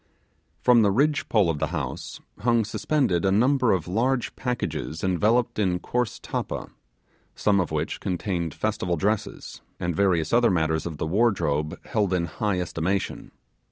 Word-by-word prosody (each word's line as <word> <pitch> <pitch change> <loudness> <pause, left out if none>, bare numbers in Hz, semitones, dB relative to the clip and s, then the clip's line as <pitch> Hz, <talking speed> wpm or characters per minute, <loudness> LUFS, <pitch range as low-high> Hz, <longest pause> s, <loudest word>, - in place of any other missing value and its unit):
From 125 -2 +6
the 105 - +4
ridge 140 +8 +1
pole 105 -5 +4
of 80 -3 -1
the 80 - 0
house 75 -6 -5 0.2
hung 115 0 +2
suspended 125 - 0
a 95 - +3
number 125 +4 +3
of 90 -3 0
large 120 +6 0
packages 125 -10 -3
enveloped 105 +6 +2
in 90 -4 +2
coarse 120 +4 -2
tappa; - - -4 0.6
some 100 -2 +2
of 90 - 0
which 75 +1 -2
contained 90 -4 -2
festival 100 -5 -1
dresses, 105 +5 -2 0.2
and 85 -1 -2
various 85 -4 +1
other 120 0 +5
matters 80 -2 0
of 80 -3 -6
the 80 - -2
wardrobe, 80 -5 +1
held 105 -5 0
in 85 -1 0
high 95 +3 -1
estimation. 90 +3 -2
95 Hz, 155 wpm, -25 LUFS, 85-115 Hz, 0.6 s, From